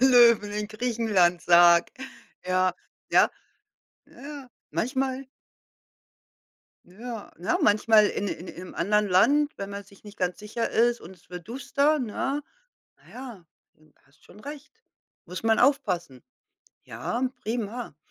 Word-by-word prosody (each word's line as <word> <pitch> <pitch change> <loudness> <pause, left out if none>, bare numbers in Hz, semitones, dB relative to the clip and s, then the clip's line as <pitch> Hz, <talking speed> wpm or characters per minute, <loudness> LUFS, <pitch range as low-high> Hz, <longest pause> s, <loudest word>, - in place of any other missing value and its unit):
Löwen, 235 -5 +6
in 210 0 -3
Griechenland, 215 -6 +1
sage 170 0 +6 0.6
Ja. 185 0 +1 0.4
Ja. - - +5 0.8
Ja, 280 -2 -10 0.2
manchmal 260 +2 -2 1.6
Ja, 225 +4 -8
ne, 185 - 0
manchmal 215 -1 +5
in 205 - -3
in 180 - -6
im 180 +1 -9
anderen 210 +4 +1
Land, 285 - +4
wenn 200 0 -6
man 200 0 -6
sich 200 0 -20
nicht 205 0 -13
ganz 180 -1 -1
sicher 215 +2 -3
ist 240 +1 +2
und 185 +3 -12
es 175 - -28
wird 180 +3 -9
duster, 280 +4 +1
ne? 270 +4 -2 0.5
Naja, 240 -9 -11 0.3
hm, 155 -1 -26
hast 140 +2 -29
schon 205 - -17
recht. 290 +4 -9 0.5
Muss 180 - -7
man 225 0 +3
aufpassen. 195 - +1 0.6
Ja, 250 +2 -3 0.2
prima. 230 - -4
215 Hz, 125 wpm, -26 LUFS, 185-250 Hz, 1.6 s, Löwen